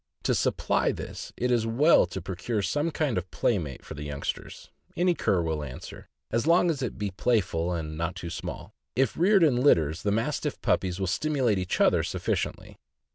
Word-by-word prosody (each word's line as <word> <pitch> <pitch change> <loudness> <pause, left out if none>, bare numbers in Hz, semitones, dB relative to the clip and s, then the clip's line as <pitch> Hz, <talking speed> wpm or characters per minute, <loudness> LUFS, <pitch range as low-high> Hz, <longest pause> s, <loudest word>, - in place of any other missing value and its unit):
To - - +2
supply - - +1
this - - -7
it 125 +1 0
is 115 -2 +2
well 130 - +5
to 90 0 -6
procure 100 +4 -2
some 145 - 0
kind 145 - 0
of 90 +1 -10
playmate 80 - -1
for - - -7
the 75 - -8
youngsters; 75 -1 -5 0.3
any 180 0 +3
cur 95 - +1
will 80 -2 -2
answer, 65 -3 -9 0.2
as 115 +6 0
long 170 +1 +5
as 140 -5 -4
it 125 - -3
be 100 -1 -2
playful 90 -5 0
and 80 -2 -4
not 85 +2 -2
too 85 -1 -6
small. - - -6 0.2
If 130 -2 +2
reared 190 +2 +4
in 140 -6 +4
litters, 85 - +3
the 105 - 0
Mastiff 115 +2 -1
puppies 90 -1 +1
will 95 - 0
stimulate 120 - +1
each 90 -1 -2
other - - +4
sufficiently. - - -3
100 Hz, 185 wpm, -27 LUFS, 85-135 Hz, 0.3 s, well